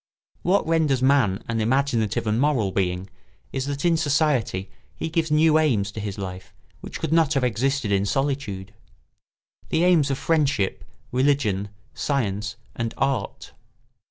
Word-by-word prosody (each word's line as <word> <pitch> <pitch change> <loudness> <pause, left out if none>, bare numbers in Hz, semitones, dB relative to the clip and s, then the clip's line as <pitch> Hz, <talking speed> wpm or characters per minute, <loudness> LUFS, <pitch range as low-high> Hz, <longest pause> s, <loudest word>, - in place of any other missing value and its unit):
What 185 +1 +2
renders 155 -6 +2
man 130 -8 +3
an 115 -1 -1
imaginative 115 -3 +1
and 110 +3 +1
moral 130 -10 +2
being 90 -1 -1 0.5
is 135 +1 -2
that 140 +3 -3
in 170 -1 +4
society 145 - 0 0.2
he - - -4
gives 165 -1 0
new 155 +1 +4
aims 110 -10 +1
to 110 - -7
his 100 -2 -4
life 95 -2 -7 0.2
which - - -8
could 155 - -1
not 160 -2 +3
have 135 - +1
existed 125 -1 0
in 100 0 +2
solitude: 110 -5 -2 1.0
the 160 - +2
aims 170 -6 +4
of 135 - -1
friendship, 145 -12 0 0.3
religion, 125 -7 +1 0.2
science, 105 -6 -2 0.2
and 115 -1 -3
art. 135 -1 -2
130 Hz, 145 wpm, -24 LUFS, 105-150 Hz, 1.0 s, in